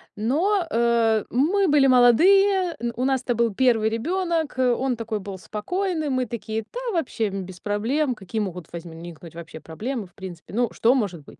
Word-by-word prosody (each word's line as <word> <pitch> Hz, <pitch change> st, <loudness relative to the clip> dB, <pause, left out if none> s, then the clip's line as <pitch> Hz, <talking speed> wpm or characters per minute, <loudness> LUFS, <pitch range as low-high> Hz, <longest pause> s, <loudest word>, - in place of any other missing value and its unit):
Но, 330 Hz, -, +1 dB
э, 230 Hz, -3 st, +2 dB
мы 355 Hz, +10 st, +2 dB
были 285 Hz, -2 st, +5 dB
молодые, 360 Hz, -, +5 dB
н 235 Hz, 0 st, -2 dB
у 250 Hz, -, 0 dB
нас 265 Hz, -1 st, +1 dB
это 245 Hz, -2 st, -1 dB
был 230 Hz, -2 st, +1 dB
1 230 Hz, -2 st, +3 dB
ребёнок, 330 Hz, +6 st, -1 dB
он 255 Hz, 0 st, +1 dB
такой 225 Hz, -1 st, -3 dB
был 195 Hz, -1 st, -7 dB
спокойный, 315 Hz, -, -3 dB
мы 255 Hz, -1 st, 0 dB
такие: 220 Hz, -1 st, -4 dB
"Да -, -, -4 dB
вообще, 265 Hz, -, -1 dB
н 195 Hz, -1 st, -5 dB
без 180 Hz, -1 st, -12 dB
проблем, 245 Hz, +7 st, 0 dB
какие 215 Hz, +2 st, -4 dB
могут 180 Hz, -5 st, -6 dB
возникнуть 170 Hz, -1 st, -9 dB
вообще 165 Hz, -1 st, -9 dB
проблемы, 220 Hz, +6 st, -5 dB
в 175 Hz, -, -29 dB
принципе? 185 Hz, -2 st, -10 dB
Ну, 240 Hz, +1 st, +1 dB
что 235 Hz, +2 st, +3 dB
может 185 Hz, -, -2 dB
быть?" -, -, -16 dB
235 Hz, 180 wpm, -24 LUFS, 205-285 Hz, -, были